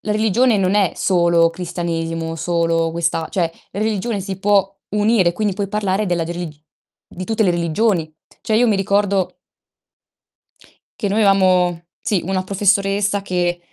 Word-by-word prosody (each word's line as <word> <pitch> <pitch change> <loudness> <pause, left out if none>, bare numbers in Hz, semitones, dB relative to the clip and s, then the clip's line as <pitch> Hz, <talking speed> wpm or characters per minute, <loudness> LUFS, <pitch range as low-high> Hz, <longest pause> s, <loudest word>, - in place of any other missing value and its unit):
la 215 - -4
religione 220 +2 +2
non 190 0 +1
è 200 -4 +2
solo 170 -2 +3
cristianesimo, 165 -1 -4
solo 165 0 0
questa 165 -1 -1
cioè, 170 -4 -1 0.2
religione 215 +1 -2
si 190 0 -5
può 195 -1 +2
unire, 210 -3 +2
quindi 205 +1 -1
puoi 200 -1 -3
parlare 205 0 -1
della 175 -2 0
delig 175 -1 -5 0.5
di 185 - -8
tutte 220 +1 0
le 180 - +3
religioni. 170 -1 0 0.3
Cioè 220 - 0
io 245 +1 +4
mi 215 - +3
ricordo 200 -1 0 1.6
che 205 - 0
noi 210 +3 +1
avevamo 180 -3 +3 0.2
sì 205 -6 0
una 190 -1 -1
professoressa 200 +1 +1
che, 175 -2 -1
190 Hz, 145 wpm, -19 LUFS, 170-205 Hz, 1.6 s, io